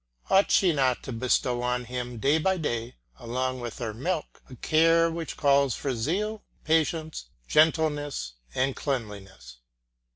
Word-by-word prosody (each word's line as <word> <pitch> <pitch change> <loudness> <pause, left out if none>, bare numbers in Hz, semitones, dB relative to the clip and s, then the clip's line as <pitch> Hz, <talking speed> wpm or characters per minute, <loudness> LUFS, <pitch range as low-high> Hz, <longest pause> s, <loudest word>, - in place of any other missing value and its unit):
Ought 195 +1 +5
she 180 -4 +4
not 130 -4 +1
to - - -6
bestow 125 +1 0
on 125 0 -1
him 125 0 -5
day 140 +7 +2
by 190 +4 +1
day, 120 -6 -3 0.2
along 130 +1 -2
with 120 -2 -6
her 115 -3 -4
milk, 155 - -4
a 130 - -10
care 165 +4 +3
which 165 -1 -5
calls 140 -3 +3
for 135 - -2
zeal, 200 - -2 0.2
patience, 160 - 0 0.2
gentleness, 150 - +1 0.2
and 130 +1 0
cleanliness. 100 - -5
135 Hz, 140 wpm, -27 LUFS, 120-160 Hz, 0.2 s, Ought